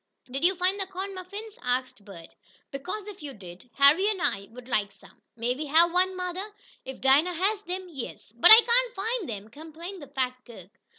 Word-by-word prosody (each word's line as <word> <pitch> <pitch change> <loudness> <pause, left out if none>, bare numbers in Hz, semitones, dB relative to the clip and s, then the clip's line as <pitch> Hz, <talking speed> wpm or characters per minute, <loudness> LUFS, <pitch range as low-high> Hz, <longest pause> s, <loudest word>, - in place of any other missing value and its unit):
"Did 270 +4 -4
you 370 +2 +4
find 370 +3 0
those 385 - -2
corn 385 +1 -6
muffins?" 400 +4 -9
asked 250 -3 -2
Bert. 190 -5 -12 0.4
"Because, 365 +10 -6
if 410 -4 -10
you 285 -2 -7
did, 185 +3 -13
Harry 295 - +5
and 415 -3 -2
I 200 - -1
would 245 +1 -13
like 205 -5 0
some. - - -20
May 235 +2 -1
we 295 +4 -5
have 335 +4 +4
one, 370 +1 +2
mother?" 370 +3 -5 0.3
"If 265 0 -9
Dinah 280 +7 +4
has 390 +5 0
them, 370 -1 -5
yes." 275 -10 -8
"But 235 - +6
I - - +15
cain't 485 +1 +3
find 445 - -2
'em!" 210 -1 -6
complained 325 - -10
the 285 - -10
fat 260 -2 -2
cook. 200 -6 -14
325 Hz, 200 wpm, -27 LUFS, 250-385 Hz, 0.4 s, I